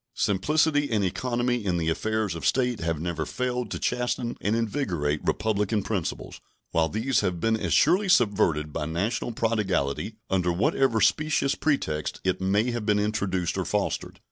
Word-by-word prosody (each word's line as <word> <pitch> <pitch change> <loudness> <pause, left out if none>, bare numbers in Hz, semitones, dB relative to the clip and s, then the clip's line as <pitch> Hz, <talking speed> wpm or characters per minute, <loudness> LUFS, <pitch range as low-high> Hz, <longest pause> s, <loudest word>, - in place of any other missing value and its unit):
Simplicity 145 - +2
and 105 -3 +1
economy 120 +4 -1
in 90 -3 0
the 80 -1 -1
affairs 110 +4 0
of 85 -3 -7
state 125 - +1
have 80 -2 -1
never 80 -1 -2
failed 125 - -2
to - - -3
chasten 125 -1 -1
and 105 +2 +1
invigorate 95 - -1
republican 105 -1 0
principles, 100 -5 -4 0.3
while 80 -1 +2
these 115 +3 +1
have 90 -4 -1
been 115 +5 +2
as 110 - -3
surely 185 +6 +4
subverted 95 - +2
by 75 -2 -2
national 100 +9 -1
prodigality, 105 -5 -1
under 90 -2 +1
whatever 115 - +2
specious 155 -2 +2
pretexts 80 - -1
it 95 0 0
may 100 +6 +2
have 120 -2 -3
been 105 -1 +2
introduced 100 -4 -1
or - - 0
fostered. - - -2
105 Hz, 160 wpm, -26 LUFS, 90-120 Hz, 0.3 s, surely